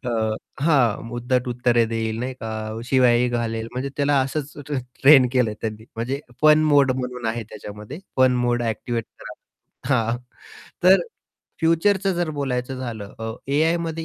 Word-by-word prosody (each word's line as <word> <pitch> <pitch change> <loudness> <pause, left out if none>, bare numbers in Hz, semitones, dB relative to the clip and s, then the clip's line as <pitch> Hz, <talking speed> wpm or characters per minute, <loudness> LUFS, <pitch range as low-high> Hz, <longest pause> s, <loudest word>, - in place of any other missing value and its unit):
अ, 125 - -2 0.5
हां, 120 -8 +2
उद्धट 125 +1 -1
उत्तरे 120 -1 +2
देईल 110 0 -2
नाही 130 +2 -3
का 110 - -5 0.3
शिव्याही 125 -1 +3
घालेल, 115 -2 -2
म्हणजे 130 +2 -3
त्याला 145 -1 +2
असंच 145 +2 -4
ट्र 150 - -3 0.3
ट्रेन 135 -2 +8
केलं 125 -4 +2
आहे 105 - -7
त्यांनी. 110 0 -5
म्हणजे 130 +5 -2 0.2
फन 155 0 +6
मोड 145 -3 +4
म्हणून 125 -2 -4
आहे 115 +1 -2
त्याच्यामध्ये 105 - -9 0.2
फन 130 -1 +4
मोड 120 0 +1
एक्टिवेट 115 0 -2
करा. - - -9 0.6
हां, 115 0 +1 0.7
तर 185 +1 +7 0.6
फ्युचरचं 190 +4 +2
जर 175 -2 -1
बोलायचं 130 -1 -2
झालं 110 -5 -6
अ, 110 0 -3 0.2
AIमध्ये 165 +2 0
125 Hz, 150 wpm, -23 LUFS, 115-145 Hz, 0.7 s, ट्रेन